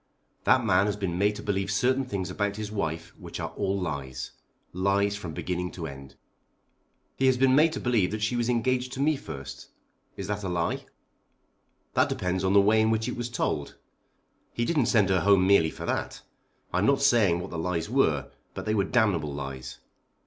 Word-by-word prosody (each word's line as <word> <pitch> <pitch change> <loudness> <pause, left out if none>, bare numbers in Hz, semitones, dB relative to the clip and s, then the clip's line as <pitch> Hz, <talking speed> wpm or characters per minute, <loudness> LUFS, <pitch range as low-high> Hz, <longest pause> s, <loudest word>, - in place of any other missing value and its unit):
"That 130 -3 +4
man 100 -1 +3
has 105 - 0
been 95 -4 -3
made 105 +1 +2
to - - -8
believe 95 -1 -1
certain 130 +6 +1
things 95 -6 -3
about 100 +2 -1
his 105 0 -5
wife 80 -5 -3
which - - -8
are - - -3
all 100 +1 -1
lies, 70 -7 -4 0.4
lies 100 +2 +1
from 85 -7 -7
beginning 90 +1 -3
to 85 - -6
end." 70 -3 -9 1.0
"He 135 - +3
has 130 -1 +4
been 130 0 +4
made 155 +3 +5
to - - -3
believe 115 -7 +2
that 110 0 -3
she 110 +3 0
was 120 0 0
engaged 125 +1 0
to - - -6
me 150 +2 +3
first. 70 - -8 0.5
Is - - -4
that 105 0 -3
a 95 - -2
lie?" 85 -1 -1 1.1
"That - - +3
depends 90 +1 -1
on 95 0 +2
the 100 - +7
way 110 +2 +4
in 110 - +3
which 110 0 0
it - - -3
was 120 0 -4
told. 75 -11 -2 0.8
He 120 - -1
didn't 150 -6 +1
send 105 -4 +3
her 95 -1 +3
home 100 -2 +4
merely 95 -5 +5
for - - -8
that. - - -3 0.5
I 90 - +2
am 100 - +2
not 140 0 +3
saying 110 -10 +4
what 90 - -6
the 85 - -4
lies 85 -1 -1
were, - - +1 0.2
but - - -5
they 110 - 0
were 100 -3 +2
damnable 95 - +1
lies. 65 -2 -6
100 Hz, 205 wpm, -27 LUFS, 85-115 Hz, 1.1 s, the